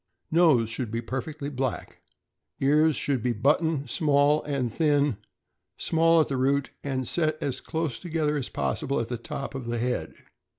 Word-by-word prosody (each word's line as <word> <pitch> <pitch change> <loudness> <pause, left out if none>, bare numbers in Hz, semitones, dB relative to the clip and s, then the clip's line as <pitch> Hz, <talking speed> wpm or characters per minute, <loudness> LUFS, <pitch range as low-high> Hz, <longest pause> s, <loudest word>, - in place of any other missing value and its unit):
Nose. 155 -9 +4
— - - -4
Should 115 0 -3
be 115 +2 -2
perfectly 140 +5 -5
black. 130 -2 -4 0.6
Ears.— 150 +3 +4
Should 135 -4 0
be 120 +1 0
button, 145 +5 +1
small, 145 +2 +3
and 135 -6 -2
thin; 145 -6 +2 0.6
small 165 0 +3
at 155 - +3
the 135 - -2
root, 140 +2 +1
and 130 -3 -2
set 155 -2 +1
as 135 -3 -3
close 160 -6 -3
together 160 -4 -1
as 140 -4 -3
possible 140 - -1
at 115 -1 -3
the 120 - -2
top 135 +4 -6
of 130 -3 -6
the 120 0 -1
head. 125 +2 -2
140 Hz, 170 wpm, -26 LUFS, 125-155 Hz, 0.6 s, Nose